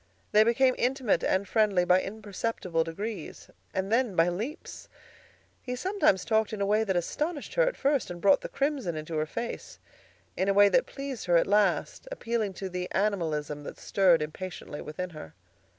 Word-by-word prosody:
They 210 +1 +6
became 255 +3 +3
intimate 250 - +1
and 190 +1 +1
friendly 205 -5 +2
by 180 +1 +4
imperceptible 200 -4 -3
degrees, 190 +2 -6 0.2
and 190 +2 -2
then 235 -4 +2
by 165 +1 +4
leaps. 220 - -6 0.7
He 250 -1 -4
sometimes 365 - +1
talked 220 -1 +1
in 215 - -4
a 200 - +1
way 210 +2 +2
that 195 -4 -1
astonished 295 - -2
her - - +2
at - - -2
first 280 -2 +1
and 175 -1 -6
brought 195 +1 +4
the - - -6
crimson 275 - -1
into 155 +1 -5
her 155 0 0
face; 235 +8 -6 0.6
in 190 - 0
a 195 - +2
way 205 0 +7
that 255 - +2
pleased 275 -3 -6
her 175 -1 +5
at - - +3
last, 205 - +1
appealing 230 - -2
to 195 - -5
the 180 -1 -4
animalism 160 -8 -1
that - - -8
stirred 180 -5 +3
impatiently 155 -1 -7
within 180 +4 -5
her. 155 - -10
200 Hz, 180 wpm, -28 LUFS, 175-235 Hz, 0.7 s, way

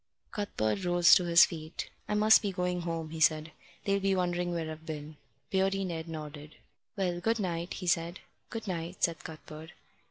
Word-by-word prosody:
Cuthbert 195 - -1
rose 175 -1 +6
to 180 - +6
his 170 0 +8
feet. 160 0 -7 0.2
"I 210 - +1
must 215 +1 +6
be 205 -2 -1
going 180 -1 -1
home," 165 -2 -4
he 160 - -6
said. 155 0 +3 0.3
"They'll 200 0 +2
be 195 0 +1
wondering 175 -1 0
where 165 -2 -2
I've 155 0 -9
been." 155 -1 -7 0.3
Beardy 195 0 +1
Ned 165 -2 -4
nodded. 150 -1 -8 0.4
"Well, 180 -3 -1
good 225 +4 +1
night," 175 -3 -2
he 185 - -6
said. 170 +1 0 0.3
"Good 225 -2 -6
night," 175 0 -4
said 170 -1 +1
Cuthbert. 155 0 -10
175 Hz, 180 wpm, -30 LUFS, 160-190 Hz, 0.4 s, his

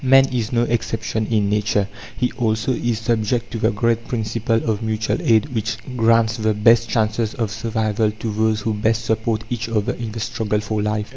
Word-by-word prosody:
Man 135 +1 +6
is 120 -2 -2
no 120 -1 +2
exception 110 -2 -1
in 105 -3 +1
nature. 105 -1 +1 0.3
He 125 - 0
also 110 +1 0
is 120 -2 -1
subject 115 +1 -1
to 115 - -4
the 110 - +3
great 115 +1 0
principle 115 -2 -1
of 110 -1 0
Mutual 110 -1 -1
Aid 115 +5 +3
which 110 -1 -2 0.2
grants 115 -1 +3
the 110 -1 +1
best 115 +2 +4
chances 110 0 0
of 110 -4 -2
survival 110 -1 0
to 110 +1 -5
those 110 0 +1
who 110 +1 -1
best 110 +2 0
support 110 0 0
each 120 -1 -2
other 105 -3 0
in 115 -2 -5
the 115 - -6
struggle 110 -2 -1
for 105 0 -2
life. 105 0 -1
110 Hz, 195 wpm, -21 LUFS, 110-115 Hz, 0.3 s, Man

